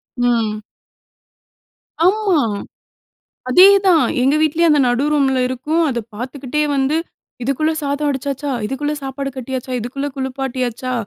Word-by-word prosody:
ம். 230 -4 0 1.4
ஆமா. 390 -3 +3 1.1
அதேதான், 380 +1 +6 0.2
எங்க 270 +4 +3
வீட்லயும் 325 +2 +3
அந்த 295 - +4
நடு 245 +2 +1
ரூம்ல 270 -3 +2
இருக்கும். 295 +6 -1
அத 240 -3 -2 0.2
பாத்துக்கிட்டே 265 +5 -3
வந்து, 275 +3 +1 0.5
"இதுக்குள்ள 275 +5 0
சாதம் 285 +1 -1
வடிச்சாச்சா, 280 +1 -3
இதுக்குள்ள 290 +6 -2
சாப்பாடு 275 +1 -4
கட்டியாச்சா, 260 0 -5
இதுக்குள்ள 270 +5 -4
குளுப்பாட்டியாச்சா? 255 -2 -3
275 Hz, 110 wpm, -18 LUFS, 255-300 Hz, 1.4 s, அதேதான்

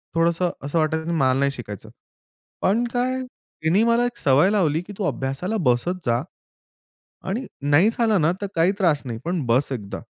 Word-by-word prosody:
थोडंसं 170 +1 +2 0.2
असं 160 +3 0
वाटायचं 160 +1 0
की - - 0
मला 130 -4 +3
नाही 140 0 +2
शिकायचं. 105 -7 -8 0.7
पण 220 +5 +2
काय? 255 +1 0 0.4
तिने 180 +8 +3
मला 235 +1 +3
एक 245 - -4
सवय 145 +7 +4
लावली 165 -6 +1
की 205 - -8
तू 205 - -3
अभ्यासाला 140 +11 -2
बसत 170 +10 +1
जा 120 0 +1 1.1
आणि 235 +7 -2 0.2
नाही 175 +10 +5
झाला 225 -4 +2
ना, 160 +2 +3
तर - - 0
काही 170 +3 +3
त्रास 165 -7 +2
नाही, 115 -2 -4
पण 170 -4 -1
बस 125 +5 +2
एकदा. 105 -6 -5
165 Hz, 180 wpm, -23 LUFS, 140-205 Hz, 1.1 s, नाही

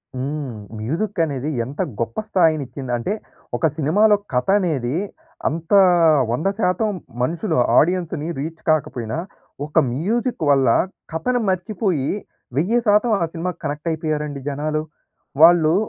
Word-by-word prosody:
హ్మ్. 135 -1 -3 0.3
మ్యూజిక్ 170 - -2
అనేది 140 -1 -3 0.2
ఎంత 140 +4 -5 0.2
గొప్ప 115 0 -3
స్థాయినిచ్చిందంటే, 140 - 0 0.4
ఒక 165 - 0
సినిమాలో 205 +9 +4 0.2
కథ 125 - 0
అనేది 145 -7 -1 0.5
అంత 165 +4 -4 0.6
100% 195 - 0 0.3
మనుషులు 165 - 0 0.2
ఆడియన్స్‌ని 170 -2 0
రీచ్ 160 +2 -5
కాకపోయినా, 130 -5 0 0.5
ఒక 150 - -14 0.2
మ్యూజిక్ 225 - -1
వల్ల, 135 -2 +4 0.5
కథను 245 +10 0
మర్చిపోయి 185 -5 -1 0.5
1000% 215 +5 +3
ఆ - - +3
సినిమాకి 175 +1 -4
కనెక్టయిపోయారండి 150 -1 -3
జనాలు. 155 +2 -2 0.6
వాళ్ళు 165 -1 +7
160 Hz, 100 wpm, -21 LUFS, 140-185 Hz, 0.6 s, వాళ్ళు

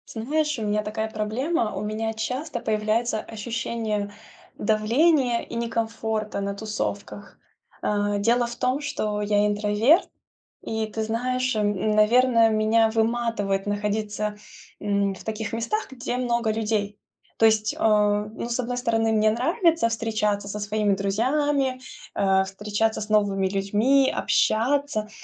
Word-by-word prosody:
Ты 220 - -4
знаешь, 300 +2 0
у 225 - -4
меня 210 0 0
такая 220 +1 -3
проблема, 220 +4 -1
у 190 - -3
меня 215 +1 -2
часто 250 +5 -3
появляется 215 +1 0
ощущение 220 -2 -3 0.5
давления 240 +4 +2
и - - -11
некомфорта 225 -2 -2
на 200 0 -3
тусовках. 205 -1 -5 0.5
Э, 205 0 0
дело 235 +4 +2
в 240 - -7
том, 255 +4 0
что 215 -8 -2
я 205 0 +2
интроверт, 210 - +3 0.5
и 220 0 -2
ты 220 +1 -4
знаешь, 255 +3 -1
м, 205 0 0
наверное, 230 +1 +5
меня 220 +1 +3
выматывает 220 -4 0
находиться, 210 0 -2 0.4
м, 200 -1 0
в - - -13
таких 220 -1 -4
местах, 230 - -2
где 245 -1 -4
много 235 -3 0
людей. 210 -2 -1 0.4
То 225 - +6
есть, 215 -1 +2
а, 210 -1 +2
ну, 220 +2 -6
с 240 +1 -1
одной 245 0 -3
стороны, 225 -2 +1
мне 215 0 +3
нравится 325 - +2
встречаться 215 -3 -1
со 205 +1 -5
своими 205 0 +1
друзьями, 255 +7 0 0.3
э, 190 -1 +3
встречаться 210 +3 -1
с 210 - -5
новыми 200 -3 +2
людьми, 210 +8 +2
общаться, 240 -1 +1
220 Hz, 135 wpm, -24 LUFS, 210-235 Hz, 0.5 s, То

